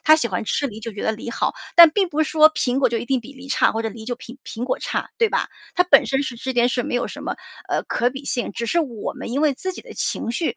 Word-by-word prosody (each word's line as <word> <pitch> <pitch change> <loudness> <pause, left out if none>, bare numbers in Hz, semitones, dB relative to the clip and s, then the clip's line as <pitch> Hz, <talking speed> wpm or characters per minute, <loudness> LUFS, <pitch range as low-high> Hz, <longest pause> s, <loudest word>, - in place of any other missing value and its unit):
他 310 0 +7
喜 310 - 0
欢 195 -1 -3
吃 285 - 0
梨 220 -3 -8
就 230 - -5
觉 200 - -6
得 220 - +2
梨 225 +2 -6
好。 - - -1 0.2
但 340 -1 +11
并 385 0 +1
不 310 -1 -2
是 - - -5
说 310 0 +6
苹 255 -1 0
果 255 - +4
就 230 -1 -1
一 235 - -6
定 265 -2 +1
比 260 +5 -12
梨 265 0 -12
差， 270 - +3
或 225 +1 -2
者 225 - -1
梨 220 +1 -10
就 245 0 -3
比 255 0 -11
苹 235 +2 -5
果 255 - -2
差， - - -3
对 455 -2 +3
吧？ - - 0 0.3
它 360 - +5
本 280 -6 +6
身 275 +1 0
是 255 - -4
这 260 +3 -4
件 240 0 +3
事 245 - 0
儿 - - -3
没 245 - -1
有 - - -1
什 - - -8
么， - - -3 0.3
呃， - - -1
可 245 +1 0
比 270 +2 -8
性， 245 -3 -2
只 235 - -4
是 340 +8 +2
我 240 -9 -4
们 - - -7
因 275 +4 -1
为 295 -3 +3
自 375 +7 -4
己 - - -9
的 - - -12
情 230 - -2
绪， 330 - -1
255 Hz, 340 characters per minute, -22 LUFS, 235-295 Hz, 0.3 s, 但